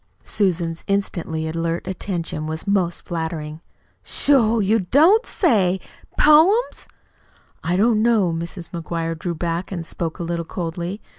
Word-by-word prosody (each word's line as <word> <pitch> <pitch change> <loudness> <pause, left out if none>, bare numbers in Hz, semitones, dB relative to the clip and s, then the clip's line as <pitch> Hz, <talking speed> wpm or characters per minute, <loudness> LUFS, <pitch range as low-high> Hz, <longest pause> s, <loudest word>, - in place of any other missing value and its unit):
Susan's 170 -4 -1
instantly 170 -5 -2
alert 165 +1 -2
attention 175 -4 -3
was 160 0 -4
most 190 -4 0
flattering. 160 -2 -4 0.4
"Sho! 235 -6 +3
You 215 +2 +2
don't 315 - +4
say! 195 - +2 0.4
Poems?" 340 +11 +4 0.8
"I 175 +2 0
don't 215 +1 +3
know." 215 -7 +3
Mrs. 170 +1 -6
McGuire 165 -1 -3
drew 170 +1 -4
back 170 +3 -3
and 170 -3 -4
spoke 165 0 -4
a - - -4
little 170 0 -2
coldly. 175 +4 -5
175 Hz, 130 wpm, -21 LUFS, 165-210 Hz, 0.8 s, don't